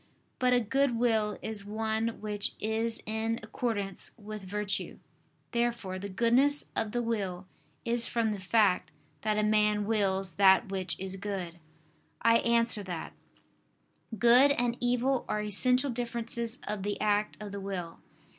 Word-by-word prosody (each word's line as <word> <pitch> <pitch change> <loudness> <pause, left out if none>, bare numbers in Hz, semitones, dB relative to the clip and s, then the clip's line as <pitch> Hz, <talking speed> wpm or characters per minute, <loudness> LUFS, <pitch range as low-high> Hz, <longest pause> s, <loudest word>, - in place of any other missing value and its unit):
But 250 0 +3
a 250 - +5
good 250 +2 +1
will 220 -3 +1
is 215 -2 -4
one 220 +2 -2
which 210 -1 -1
is 225 +1 -1
in 220 +1 -1
accordance 215 -4 -3
with 215 -1 -8
virtue. 200 +1 -3 0.5
Therefore 235 -6 -1
the 200 +1 -6
goodness 245 +8 +3
of 220 -2 -1
the 240 +1 -1
will 195 -5 -2 0.4
is 235 0 0
from 230 -2 0
the 205 - -4
fact 190 -3 +2 0.3
that 215 -1 0
a 215 - +2
man 210 -1 +2
wills 195 -3 0
that 195 +2 +5
which 190 -2 -3
is 190 0 -5
good. 190 -4 -5 0.6
I 230 +1 +5
answer 230 -2 +3
that, 180 -4 -6 1.0
Good 240 +6 +7
and 245 -4 +1
evil 245 +1 +1
are 210 - -1
essential 250 +6 +3
differences 235 0 -3
of 210 -1 -3
the 205 +1 -3
act 210 0 +1
of 210 -1 -7
the 200 0 -6
will. 180 -4 -5
215 Hz, 145 wpm, -30 LUFS, 200-235 Hz, 1.0 s, Good